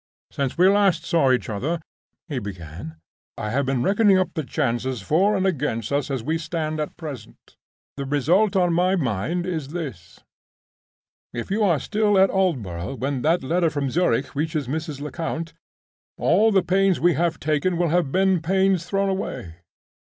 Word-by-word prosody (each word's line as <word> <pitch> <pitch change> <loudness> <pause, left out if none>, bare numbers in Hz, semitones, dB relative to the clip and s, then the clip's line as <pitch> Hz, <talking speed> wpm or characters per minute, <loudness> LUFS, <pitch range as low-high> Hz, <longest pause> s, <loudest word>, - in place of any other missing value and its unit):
"Since 140 +1 -2
we 180 +2 +6
last 195 -4 +3
saw 160 -7 +3
each 125 - +1
other," 130 +11 -2 0.5
he 145 -6 -3
began, 85 -5 -8 0.4
"I 105 - -3
have 140 +2 0
been 130 -3 0
reckoning 200 - +4
up 185 - 0
the 155 - -2
chances 125 -1 -1
for 185 - +2
and 190 - 0
against 145 - -1
us 140 -1 0
as 135 -4 -2
we 160 +4 -1
stand 155 -1 -3
at 150 - -4
present. 150 -6 -10 0.4
The 140 - -3
result 170 +10 +2
on 180 -2 +3
my 180 +2 +2
own 180 -6 +1
mind 125 - -1
is 160 -6 -3
this: 140 - -7 1.1
If 120 +8 -5
you 215 +3 +1
are 170 -7 +3
still 210 - +1
at 190 0 +5
Aldborough 125 - -1
when 135 0 -2
that 165 +3 +2
letter 170 +4 +1
from 145 -3 -2
Zurich 140 -6 +1
reaches 155 -1 -2
Mrs. 155 0 -4
Lecount, 165 +2 -4 0.6
all 210 +6 +3
the 190 -3 +3
pains 190 +1 +2
we 175 0 +4
have 170 0 0
taken 155 +4 0
will 175 -1 +1
have 165 -4 +1
been 190 -1 +2
pains 190 0 +2
thrown 195 +2 0
away. 125 - -4
160 Hz, 175 wpm, -23 LUFS, 135-185 Hz, 1.1 s, we